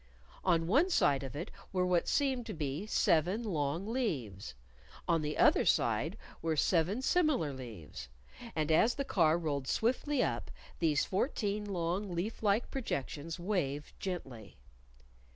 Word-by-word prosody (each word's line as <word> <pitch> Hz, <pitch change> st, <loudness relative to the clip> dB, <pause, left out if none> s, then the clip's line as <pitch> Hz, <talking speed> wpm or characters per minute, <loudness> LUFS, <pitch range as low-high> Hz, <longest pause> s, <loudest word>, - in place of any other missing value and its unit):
On 170 Hz, -3 st, +2 dB
one 275 Hz, -, +3 dB
side 140 Hz, -, +3 dB
of 135 Hz, 0 st, -7 dB
it 160 Hz, +4 st, -5 dB, 0.2 s
were 185 Hz, -1 st, +1 dB
what 180 Hz, -2 st, +2 dB
seemed 265 Hz, -5 st, +1 dB
to 215 Hz, -, -5 dB
be 150 Hz, +5 st, -3 dB
seven 185 Hz, +3 st, +2 dB
long 165 Hz, -3 st, -1 dB
leaves. 135 Hz, -, -3 dB, 0.5 s
On 165 Hz, -2 st, +2 dB
the 150 Hz, 0 st, -3 dB
other -, -, +5 dB
side -, -, +1 dB, 0.2 s
were 165 Hz, -1 st, 0 dB
seven 180 Hz, -, +2 dB
similar 290 Hz, -, +2 dB
leaves. 110 Hz, -, -9 dB, 0.5 s
And 155 Hz, -1 st, 0 dB
as 225 Hz, +9 st, +4 dB
the 275 Hz, -, -2 dB
car 165 Hz, -, +3 dB
rolled 145 Hz, -5 st, -2 dB
swiftly 260 Hz, +4 st, +1 dB
up, -, -, -2 dB, 0.3 s
these 155 Hz, -4 st, +2 dB
fourteen 210 Hz, -1 st, -1 dB
long 180 Hz, 0 st, -2 dB
leaf 195 Hz, +7 st, -3 dB
like 210 Hz, +2 st, +1 dB
projections 160 Hz, -, -4 dB
waved 150 Hz, -7 st, -2 dB
gently. 135 Hz, -, -6 dB
175 Hz, 140 wpm, -33 LUFS, 150-215 Hz, 0.5 s, other